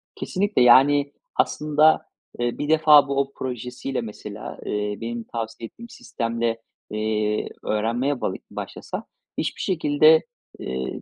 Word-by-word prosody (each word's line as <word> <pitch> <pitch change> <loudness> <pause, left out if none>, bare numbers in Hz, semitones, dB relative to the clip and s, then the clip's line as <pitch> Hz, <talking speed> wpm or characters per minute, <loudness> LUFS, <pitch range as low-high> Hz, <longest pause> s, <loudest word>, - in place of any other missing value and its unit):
Kesinlikle! 205 -5 0
Yani, 140 +4 +6 0.2
aslında, 150 +1 +3 0.3
eee, 120 0 -1
1 145 - -3
defa 155 -2 +6
bu 140 0 0
o 140 0 -4
projesiyle 125 +1 -4
mesela, 105 -1 -8
eee, 105 0 -2
benim 115 0 -4
tavsiye 115 0 -6
ettiğim 235 - -13
sistemle, 115 - -3 0.3
eee, 105 0 -1 0.2
öğrenmeye 120 +6 -1
bağı - - -1 0.2
başlasa - - -6 0.3
hiçbir - - -2
şekilde, 155 -2 +4 0.4
eee, 65 +1 -4
125 Hz, 120 wpm, -23 LUFS, 115-145 Hz, 0.4 s, Yani